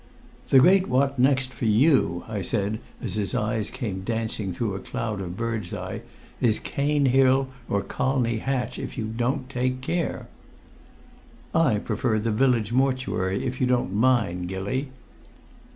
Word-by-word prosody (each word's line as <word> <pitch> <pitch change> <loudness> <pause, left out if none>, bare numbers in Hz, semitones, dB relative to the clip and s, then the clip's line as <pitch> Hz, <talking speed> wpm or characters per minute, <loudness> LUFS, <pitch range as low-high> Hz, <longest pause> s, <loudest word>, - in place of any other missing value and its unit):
"The - - +6
Great 185 +7 +6
What 135 +1 +1
Next 130 0 +2
for 120 - -4
you," 110 - +3
I 110 -3 -3
said, 100 +4 -1 0.2
as 105 -7 -3
his 105 +3 -2
eyes 110 -2 -1
came 95 -6 -4
dancing 110 -2 -2
through 100 +3 -2
a 95 - -4
cloud 105 0 -4
of 90 0 -6
birdseye, 110 -5 -3 0.4
"is 110 -3 +3
Cane 145 0 0
Hill 135 +1 +4 0.2
or 100 -1 +1
Colney 125 -4 0
Hatch, 130 +1 -2
if - - -6
you 115 - -2
don't 120 +4 -1
take 130 0 -1
care." 170 +6 -2 1.3
"I 150 -10 +3
prefer 110 +2 -1
the 110 +1 0
Village 115 -2 +2
mortuary, 125 -8 0
if 130 +1 -3
you 130 - +3
don't 125 -6 +1
mind, 105 -6 +2
Gilly." 100 +9 -2
120 Hz, 150 wpm, -25 LUFS, 105-130 Hz, 1.3 s, The